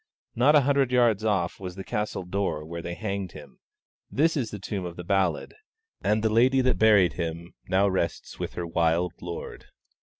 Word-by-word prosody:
Not 135 Hz, +6 st, +4 dB
a 150 Hz, -, +7 dB
hundred 135 Hz, -1 st, +2 dB
yards 120 Hz, -4 st, +3 dB
off 100 Hz, -5 st, 0 dB
was 90 Hz, -2 st, -6 dB
the 95 Hz, -, -6 dB
castle 105 Hz, -2 st, -3 dB
door 90 Hz, -5 st, -2 dB
where 85 Hz, +1 st, -6 dB
they 85 Hz, +1 st, -5 dB
hanged 100 Hz, -3 st, -4 dB
him; 70 Hz, -4 st, -13 dB, 0.5 s
this 160 Hz, +4 st, +2 dB
is 125 Hz, -7 st, -1 dB
the 105 Hz, -, -6 dB
tomb 100 Hz, 0 st, -4 dB
of 85 Hz, -1 st, -6 dB
the 90 Hz, -, -7 dB
ballad, 95 Hz, -3 st, 0 dB, 0.5 s
and 105 Hz, +1 st, +1 dB
the 110 Hz, -1 st, +1 dB
lady 130 Hz, +4 st, +4 dB
that 130 Hz, 0 st, +1 dB
buried 105 Hz, -5 st, +5 dB
him 85 Hz, 0 st, -5 dB, 0.2 s
rests 95 Hz, -3 st, 0 dB
now -, -, -22 dB
with -, -, -4 dB
her 90 Hz, -, -4 dB
wild 85 Hz, +1 st, +1 dB
lord. 85 Hz, -1 st, -7 dB
95 Hz, 190 wpm, -26 LUFS, 85-110 Hz, 0.5 s, a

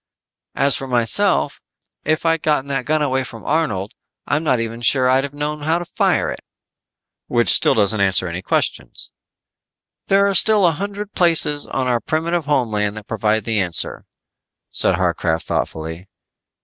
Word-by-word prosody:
As 140 Hz, +1 st, +3 dB
for 135 Hz, -, -4 dB
myself, 120 Hz, -3 st, +1 dB, 0.4 s
if 155 Hz, +2 st, -1 dB
I'd 165 Hz, 0 st, +2 dB
of -, -, -46 dB
gotten 150 Hz, -3 st, 0 dB
that 135 Hz, -2 st, -2 dB
gun 155 Hz, 0 st, +1 dB
away 130 Hz, -2 st, 0 dB
from 115 Hz, -3 st, -11 dB
Arnold, 110 Hz, -11 st, -1 dB, 0.3 s
I'm 150 Hz, +3 st, -1 dB
not 130 Hz, -6 st, +1 dB
even 115 Hz, +1 st, -4 dB
sure 130 Hz, +1 st, +3 dB
I'd 130 Hz, +1 st, +3 dB
have 140 Hz, 0 st, -6 dB
known 150 Hz, +1 st, -3 dB
how 160 Hz, +3 st, +1 dB
to 175 Hz, -, -5 dB
fire -, -, 0 dB
it." -, -, -6 dB, 0.9 s
"Which 120 Hz, -1 st, +1 dB
still -, -, +4 dB
doesn't 105 Hz, -1 st, +1 dB
answer 95 Hz, -1 st, +3 dB
any 85 Hz, +2 st, -5 dB
questions." -, -, -2 dB, 1.0 s
"There 195 Hz, +1 st, +4 dB
are 200 Hz, -, +1 dB
still 210 Hz, +1 st, +4 dB
a 170 Hz, -, +4 dB
hundred 200 Hz, +5 st, -6 dB
places 160 Hz, -4 st, +2 dB
on 130 Hz, -, -2 dB
our 125 Hz, -2 st, +1 dB
primitive 165 Hz, +4 st, -1 dB
homeland 110 Hz, -8 st, 0 dB
that 105 Hz, -, -9 dB
provide 110 Hz, 0 st, 0 dB
the 110 Hz, -2 st, 0 dB
answer," 90 Hz, -3 st, -1 dB, 0.7 s
said -, -, +1 dB
Harcraft 85 Hz, -2 st, -1 dB
thoughtfully. 80 Hz, +4 st, -4 dB
130 Hz, 165 wpm, -19 LUFS, 105-155 Hz, 1.0 s, still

